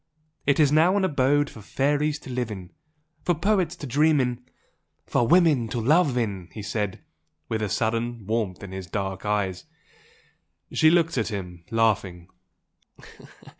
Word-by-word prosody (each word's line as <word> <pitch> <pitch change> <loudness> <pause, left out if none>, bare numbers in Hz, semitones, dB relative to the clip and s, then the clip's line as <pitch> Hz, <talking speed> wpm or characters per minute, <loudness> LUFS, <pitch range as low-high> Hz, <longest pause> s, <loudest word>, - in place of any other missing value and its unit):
It 140 +1 +3
is 145 -2 +5
now 165 +6 +4
an 195 - +2
abode 145 -2 +2
for 110 - -11
fairies 145 +6 0
to 130 - -9
live 125 -2 -2
in, 95 -4 -8 0.5
for 175 - +1
poets 185 0 +1
to - - -8
dream 150 +3 +3
in 125 -1 -1 0.3
" - - -50
"For 120 - +1
women 155 -7 +4
to 115 - -3
love 140 +2 +3
in!" 100 -7 -2
he 105 - -7
said, 105 -1 -3 0.5
with 110 -1 -1
a 105 - -1
sudden 115 +1 -1
warmth 105 -3 -2
in 100 - -8
his 95 -1 -6
dark 95 0 -4
eyes. 100 -3 -1 1.1
She 155 - +5
looked 165 -4 +2
at 110 - -1
him, 90 -5 -6
laughing. 100 -6 0
120 Hz, 160 wpm, -25 LUFS, 100-150 Hz, 1.1 s, is